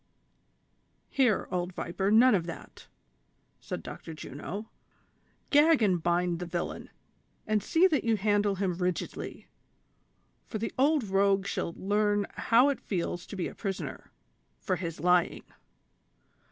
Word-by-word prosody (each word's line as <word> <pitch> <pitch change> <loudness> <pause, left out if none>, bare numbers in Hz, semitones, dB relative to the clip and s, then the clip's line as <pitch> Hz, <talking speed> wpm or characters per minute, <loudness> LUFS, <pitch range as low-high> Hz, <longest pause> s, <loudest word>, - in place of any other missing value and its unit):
"Here, 255 -7 +2
old 180 0 -2
viper, 190 +3 -2
none 235 +4 +6
of 175 -4 +1
that," 170 - -9 0.7
said - - -6
Dr. 160 - -8
Juno; 175 +9 -7 0.8
"gag 295 -3 +5
and 185 -5 +2
bind 175 0 +1
the 180 - -5
villain, 170 0 -4 0.6
and 215 -1 +1
see 330 - +3
that 320 -6 +2
you 225 -2 +2
handle 205 0 +2
him 190 -1 -1
rigidly, 180 -1 -3 1.0
for 220 - -4
the 225 +2 -4
old 290 +1 +3
rogue 195 -1 +2
shall 170 -3 -3
learn 205 +1 +1
how 245 +5 +4
it 280 - -2
feels 175 -2 -3
to - - -7
be 185 - -2
a - - -8
prisoner, 195 -3 -5 0.5
for 185 - -1
his 165 -2 -5
lying." 180 +1 +2
195 Hz, 135 wpm, -29 LUFS, 175-220 Hz, 1.0 s, none